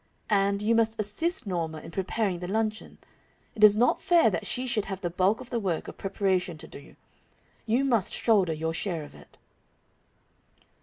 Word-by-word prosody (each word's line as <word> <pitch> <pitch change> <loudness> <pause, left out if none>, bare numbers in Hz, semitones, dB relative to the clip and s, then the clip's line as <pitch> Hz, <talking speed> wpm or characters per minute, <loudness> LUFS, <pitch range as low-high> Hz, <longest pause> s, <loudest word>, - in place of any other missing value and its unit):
And, 200 0 +2
you 225 +2 +3
must 225 -1 +1
assist 220 - -1
Norma 165 -5 -3
in 155 - -10
preparing 190 0 -1
the 180 - -5
luncheon. 215 +2 -2 0.6
It 215 - -2
is 210 0 +8
not 240 +2 +3
fair 335 -10 +4
that 175 - -3
she 255 - -2
should 230 -5 -1
have 195 -1 -6
the 175 -3 -2
bulk 190 +5 +2
of 255 - -12
the 235 - 0
work 185 -6 -2
of - - -10
preparation 190 -3 -1
to 160 +1 -11
do. 140 - -13 0.7
You 245 +5 +2
must 230 -8 +1
shoulder 200 -7 +2
your 160 +1 -3
share 165 -2 -3
of 145 - -12
it." - - -17
200 Hz, 185 wpm, -27 LUFS, 180-225 Hz, 0.7 s, is